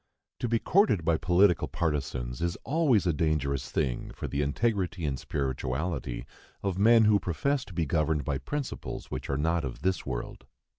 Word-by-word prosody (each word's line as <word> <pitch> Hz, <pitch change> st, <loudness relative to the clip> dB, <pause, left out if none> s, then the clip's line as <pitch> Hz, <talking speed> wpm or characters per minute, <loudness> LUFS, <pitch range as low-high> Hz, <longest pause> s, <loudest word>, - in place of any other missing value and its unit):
To 120 Hz, -, -1 dB
be 115 Hz, -, +3 dB
courted 155 Hz, -, +3 dB
by 80 Hz, -1 st, +3 dB
political 90 Hz, +2 st, +3 dB
partisans 70 Hz, -6 st, -2 dB
is 85 Hz, 0 st, 0 dB
always 140 Hz, -, +2 dB
a 85 Hz, -, +2 dB
dangerous 70 Hz, -4 st, 0 dB
thing -, -, -1 dB
for -, -, -4 dB
the 70 Hz, -, -1 dB
integrity 90 Hz, +3 st, 0 dB
and 65 Hz, -3 st, -1 dB
spirituality 65 Hz, 0 st, -3 dB, 0.4 s
of 95 Hz, -2 st, -1 dB
men 115 Hz, +2 st, +6 dB
who 105 Hz, -1 st, +5 dB
profess 130 Hz, -, 0 dB
to 100 Hz, -, -12 dB
be 80 Hz, -, +1 dB
governed 75 Hz, 0 st, 0 dB
by 70 Hz, -2 st, -1 dB
principles 145 Hz, -, -5 dB
which -, -, -5 dB
are 70 Hz, -, 0 dB
not 80 Hz, +2 st, +1 dB
of 65 Hz, +3 st, -6 dB
this 95 Hz, 0 st, +1 dB
world. 60 Hz, -3 st, -5 dB
85 Hz, 170 wpm, -29 LUFS, 70-100 Hz, 0.4 s, men